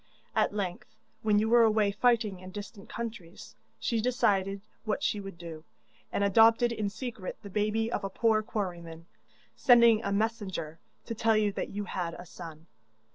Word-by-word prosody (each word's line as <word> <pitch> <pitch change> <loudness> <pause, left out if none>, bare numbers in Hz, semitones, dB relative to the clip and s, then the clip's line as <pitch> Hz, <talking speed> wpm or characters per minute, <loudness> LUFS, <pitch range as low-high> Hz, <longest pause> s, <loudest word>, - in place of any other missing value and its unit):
At - - +3
length, 200 0 -4 0.3
when 210 -1 +3
you 215 +1 +2
were 235 +1 +6
away 215 -2 +4
fighting 215 -3 +2
in 185 0 -10
distant 205 +1 -9
countries, 220 -7 -7 0.3
she 230 -2 0
decided 200 -5 +1 0.2
what 225 +6 -2
she 210 - 0
would 195 -3 -8
do, 165 -2 -9 0.5
and - - 0
adopted 225 +4 +5
in 215 -3 -2
secret 220 -3 -6
the 200 - -9
baby 215 +3 0
of 210 - -2
a 195 - -2
poor 220 +2 +2
quarryman, 175 -7 -5 0.5
sending 235 -3 +6
a 200 - -1
messenger 200 -7 -2 0.3
to - - -4
tell 225 0 +2
you 210 -1 +2
that - - -4
you 205 +1 -4
had 175 -3 -4
a 175 - -10
son. 165 -2 -10
205 Hz, 170 wpm, -29 LUFS, 185-225 Hz, 0.5 s, were